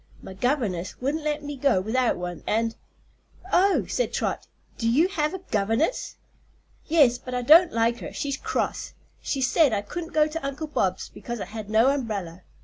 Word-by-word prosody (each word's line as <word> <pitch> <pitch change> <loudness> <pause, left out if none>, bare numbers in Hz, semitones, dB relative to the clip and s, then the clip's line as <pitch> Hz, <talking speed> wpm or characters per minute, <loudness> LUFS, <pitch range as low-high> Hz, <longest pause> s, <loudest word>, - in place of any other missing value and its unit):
My 190 - -8
governess 195 - -1
wouldn't 290 +5 -2
let 300 0 -2
me 290 0 -5
go 265 -7 +2
without 235 +5 0
one, 175 -2 -5
and 225 +1 0 0.4
" - - -41 0.3
"Oh," 390 +2 +4
said - - -1
Trot; - - -2 0.3
"do 230 -2 +1
you 300 +9 +4
have 315 -2 -1
a 375 - -7
governess?" 225 - 0 0.7
"Yes; 285 -7 +4
but 255 0 -6
I 250 - -1
don't 330 +7 +7
like 230 +1 +1
her; - - -7
she's 280 -1 -3
cross. - - -3 0.3
She 275 - -2
said 275 0 +3
I 205 -1 0
couldn't 335 - -6
go 305 -1 +4
to 310 +1 -5
Uncle 275 +3 -3
Bob's 190 -11 -1
because 240 -1 -7
I - - -4
had 215 -1 -8
no 225 +5 +4
umbrella. 200 -10 -4
255 Hz, 185 wpm, -25 LUFS, 220-300 Hz, 0.7 s, don't